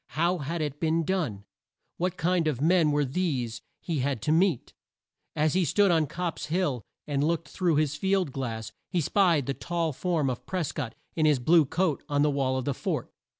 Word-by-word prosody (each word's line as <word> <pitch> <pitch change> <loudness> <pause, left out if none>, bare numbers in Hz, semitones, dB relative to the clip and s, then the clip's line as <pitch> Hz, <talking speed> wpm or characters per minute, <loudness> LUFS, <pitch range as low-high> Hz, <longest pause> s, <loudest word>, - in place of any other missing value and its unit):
How 175 +2 +2
had 160 +4 -3
it 145 -1 -4
been 165 0 +1
done? 155 - -1 0.5
What 180 0 -1
kind 170 0 +1
of 145 -6 0
men 165 +1 +4
were 145 0 +2
these 130 -7 -2 0.2
he 165 -4 -2
had 135 -1 0
to 150 - +1
meet? 165 -4 +2 0.6
As 155 0 +2
he 185 - +3
stood 195 +5 +3
on 160 -3 +3
Copp's 175 +2 -4
Hill 155 -7 0 0.2
and 145 -1 0
looked 165 0 0
through 175 -4 +1
his 150 -1 +1
field 190 -1 +1
glass, 115 -5 -4 0.2
he 180 - 0
spied 170 -3 +3
the 140 - -1
tall 170 0 -2
form 165 -1 0
of 125 -2 -4
Pres 185 -5 -2
cott, 125 -7 -5 0.2
in 155 -1 +3
his 150 -2 +4
blue 155 +5 +4
coat, 160 +1 0
on 145 0 +2
the 150 - +3
wall 135 -2 0
of 130 - -3
the 140 - 0
fort. - - -3
155 Hz, 200 wpm, -27 LUFS, 140-175 Hz, 0.6 s, men